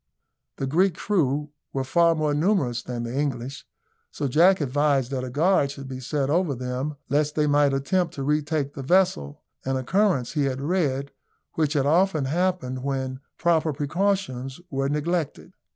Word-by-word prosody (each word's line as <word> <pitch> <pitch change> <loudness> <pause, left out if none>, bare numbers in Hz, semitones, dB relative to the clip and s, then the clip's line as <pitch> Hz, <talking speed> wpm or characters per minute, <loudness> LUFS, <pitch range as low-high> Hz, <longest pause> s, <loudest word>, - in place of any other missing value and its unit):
The 135 - -3
Greek 175 +6 +2
crew 150 -7 0 0.2
were 135 - -1
far 170 +5 +3
more 155 -2 0
numerous 150 - +1
than 120 -1 -5
the 120 +2 -5
English; 135 -2 -3 0.4
so 145 - -3
Jack 175 +8 +5
advised 140 -2 +1
that 130 -2 -2
a 130 - -4
guard 150 +2 +2
should 140 -1 -8
be 130 -1 -6
set 135 +2 -1
over 160 -1 +1
them 130 +4 -3
lest 150 +2 +1
they 150 - +2
might 145 -1 +3
attempt 165 +6 0
to 140 - -4
retake 150 0 0
the 140 - -6
vessel 130 - +1 0.2
an 135 0 -1
occurrence, 135 - +1
he 145 -3 0
had 130 -1 -2
read, 140 -3 -1 0.4
which 155 -2 0
had 140 -3 +1
often 160 -1 +2
happened 165 -4 -1
when 130 -1 -3 0.2
proper 165 -2 +2
precautions 145 -3 -1
were 135 0 0
neglected. 155 +1 -2
145 Hz, 165 wpm, -25 LUFS, 135-165 Hz, 0.4 s, Jack